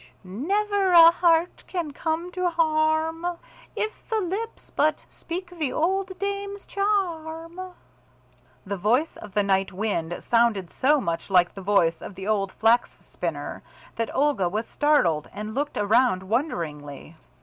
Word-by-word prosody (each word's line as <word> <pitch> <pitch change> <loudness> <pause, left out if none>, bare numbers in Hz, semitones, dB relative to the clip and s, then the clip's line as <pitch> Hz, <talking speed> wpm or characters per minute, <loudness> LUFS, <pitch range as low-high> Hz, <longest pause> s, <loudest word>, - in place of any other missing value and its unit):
"Sh - - -20
sh! 125 0 -25
Never 390 - 0
a 335 -1 +10
heart 335 0 +2
can 345 -5 -3
come 325 +4 -2
to 365 0 0
harm, 320 +1 +1 0.4
if 435 - -4
the 445 -1 +1
lips 415 +5 -5
but 305 +1 +1
speak 350 +1 -6
the 315 -7 -2
old 375 +3 -1
dame's 400 0 -4
charm." 345 -4 -2 1.0
The 200 +1 -3
voice 240 - +1
of 205 - -11
the 205 - +3
night 195 0 +1
wind 180 -4 -2
sounded 230 -6 +1
so 295 +3 +3
much 170 -7 -3
like 180 -2 +4
the 195 - -8
voice 180 -4 +2
of 195 - -8
the 190 +1 -7
old 200 -3 0
Flax 230 +2 +2
spinner, - - -5 0.3
that 230 0 -2
Olga 275 -11 +2
was 215 +5 -2
startled 185 - +2
and 215 +1 -6
looked 285 +4 -2
around 210 -1 +3
wonderingly. 165 - -3
295 Hz, 150 wpm, -25 LUFS, -, 1.0 s, a